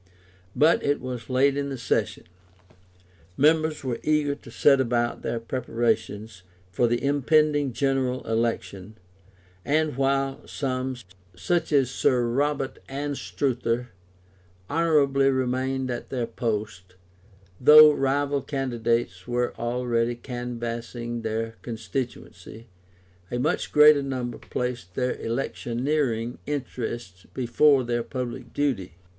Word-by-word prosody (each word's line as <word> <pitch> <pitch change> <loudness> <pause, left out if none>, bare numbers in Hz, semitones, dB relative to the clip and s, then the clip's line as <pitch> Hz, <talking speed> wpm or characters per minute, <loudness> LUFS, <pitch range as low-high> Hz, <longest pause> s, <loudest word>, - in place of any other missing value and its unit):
But 160 +3 +4
it 145 0 +1
was 125 -2 -6
late 135 +2 +3
in 140 0 -2
the 135 - -4
session; 125 - -1 1.1
members 155 +1 +3
were 125 -3 -2
eager 150 -2 +1
to 140 - -12
set 135 +3 +4
about 120 -1 0
their 115 - -2
preparations 115 -4 -2 0.3
for 120 +7 +2
the 120 +1 -1
impending 145 0 +2
General 130 0 0
Election: 110 -3 -2 0.7
and 155 0 +1
while 135 0 0
some 130 -1 -2 0.4
(such 160 - -1
as 135 -4 +3
Sir 125 -2 +2
Robert 140 +2 -1
Anstruther) 135 -3 -2 0.8
honourably 145 -4 +3
remained 130 0 -1
at 120 - -5
their 125 -3 -2
post, 105 -6 -4 0.6
though 150 +3 +9
rival 140 0 0
candidates 120 -8 -2
were 120 0 -1
already 120 0 0
canvassing 120 -1 -5
their 115 0 -3
constituency, 115 0 -6 0.6
a 120 - -2
much 150 +7 -1
greater 150 -1 +7
number 130 -3 -4
placed 120 -8 -4
their 125 -1 0
electioneering 120 0 -2
interests 120 -9 -5
before 135 +2 +3
their 120 0 -1
public 125 -1 -5
duty. 115 - -1
125 Hz, 110 wpm, -25 LUFS, 115-140 Hz, 1.1 s, though